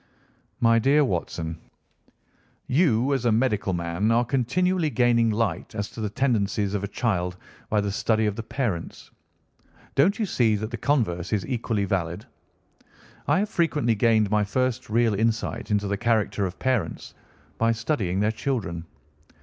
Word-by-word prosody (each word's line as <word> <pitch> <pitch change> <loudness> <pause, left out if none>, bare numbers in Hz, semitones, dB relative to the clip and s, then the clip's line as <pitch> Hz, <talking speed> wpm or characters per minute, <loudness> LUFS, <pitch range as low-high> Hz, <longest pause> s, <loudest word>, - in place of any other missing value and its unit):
"My 115 -1 +4
dear 140 +5 +4
Watson, 85 -5 -3 1.1
you 135 -3 +2
as 135 -3 -1
a 120 - +4
medical 110 -4 +1
man 85 +4 -1
are 120 +1 +3
continually 160 +8 +1
gaining 120 -3 +3
light 110 -2 -2
as 105 -1 -3
to 115 - -7
the 105 - -1
tendencies 105 -4 0
of 100 -1 -2
a - - -1
child 90 -5 -1 0.3
by 105 -1 +2
the 100 0 -2
study 110 +2 +1
of 105 -1 0
the 115 - -4
parents. 110 -7 -4 0.8
Don't 175 +9 +3
you 220 - 0
see 115 - +2
that 110 +3 -4
the - - -3
converse 105 - 0
is 100 -5 0
equally 110 -2 -1
valid. 90 +1 -2 1.0
I - - +3
have 210 - -2
frequently 155 - +1
gained 110 -1 +2
my 105 -1 +3
first 130 +3 -1
real 115 0 +2
insight 115 +2 -1
into 105 -1 +1
the 100 0 -1
character 110 -3 +1
of 90 - -8
parents 125 -11 -2 0.5
by 115 0 +3
studying 110 - -1
their 105 +1 +2
children. 110 -8 -3
110 Hz, 160 wpm, -25 LUFS, 100-125 Hz, 1.1 s, My